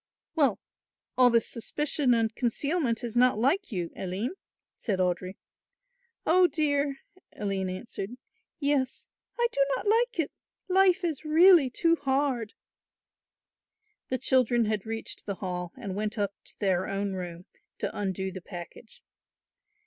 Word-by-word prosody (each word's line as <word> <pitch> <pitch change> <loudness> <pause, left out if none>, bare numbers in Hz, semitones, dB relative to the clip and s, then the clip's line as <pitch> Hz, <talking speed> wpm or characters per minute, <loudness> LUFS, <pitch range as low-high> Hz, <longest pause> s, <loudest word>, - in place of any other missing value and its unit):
"Well, 280 - +2 0.6
all 250 -1 +6
this 230 -1 +3
suspicion 275 +1 +1
and 225 -1 +1
concealment 250 +1 0
is 235 -1 -4
not 250 -1 +4
like 280 - +1
you, 175 -5 -3
Aline," 190 - -3 0.4
said 205 -5 -2
Audry. 185 +1 -1 0.9
"Oh, 360 +2 +5
dear," 285 -3 0 0.4
Aline 195 -2 -2
answered, 195 +2 -6 0.5
"yes, 280 -3 0 0.3
I 475 - +2
do 280 - +3
not 255 - -5
like 455 0 +2
it; 315 - 0 0.4
life 380 0 +4
is 320 -5 -2
really 320 -1 +6
too 335 +7 +2
hard." 265 -5 0 1.5
The 255 - 0
children 250 -2 +3
had 215 -1 -2
reached 225 -1 -4
the 200 - -2
Hall 180 -2 -4
and 205 -7 -5
went 210 +2 -2
up 200 -1 -1
to - - -11
their 190 -2 +1
own 195 0 -2
room 175 -1 -6 0.3
to - - -4
undo 190 -1 -2
the 185 0 -8
package. 175 +5 -10
240 Hz, 135 wpm, -28 LUFS, 195-290 Hz, 1.5 s, all